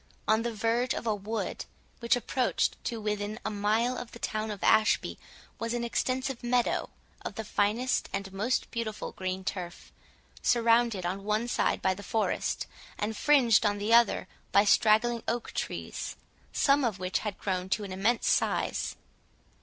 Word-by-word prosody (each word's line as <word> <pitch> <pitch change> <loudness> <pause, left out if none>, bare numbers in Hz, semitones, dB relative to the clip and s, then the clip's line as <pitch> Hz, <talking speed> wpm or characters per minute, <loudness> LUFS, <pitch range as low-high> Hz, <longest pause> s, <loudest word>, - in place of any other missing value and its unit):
On 220 +1 +4
the 235 0 -2
verge 230 +3 0
of - - -5
a 220 - +2
wood, 210 +2 -4 0.3
which 235 0 +3
approached 245 0 0
to 230 -2 -2
within 210 0 -3
a 215 - -1
mile 215 +4 +1
of 240 - -9
the - - -8
town 215 -1 -2
of 205 -2 -6
Ashby, 220 0 +3 0.4
was 230 +1 -2
an 240 - -2
extensive 255 +2 -1
meadow, 245 0 +1 0.3
of - - -5
the 220 - -4
finest 215 +6 0
and 195 0 -4
most 215 +6 -1
beautiful 225 -3 -4
green 185 0 -4
turf, 180 -2 -5 0.5
surrounded 230 -4 +3
on 190 +3 -3
one 215 +3 0
side - - 0
by 190 - +3
the 195 - -9
forest, 220 +1 -1 0.3
and 215 +1 -2
fringed 250 -5 +4
on 205 -1 +1
the 210 +3 0
other 235 -2 +4 0.2
by 200 - +6
straggling 225 +3 +4
oak 235 +1 -2
trees, - - -4 0.4
some 280 0 +3
of 225 -6 0
which 185 0 -1
had 210 -3 -4
grown 185 -1 -2
to 210 - 0
an 195 - -6
immense 205 +6 +1
size. - - +1
220 Hz, 165 wpm, -29 LUFS, 205-235 Hz, 0.5 s, by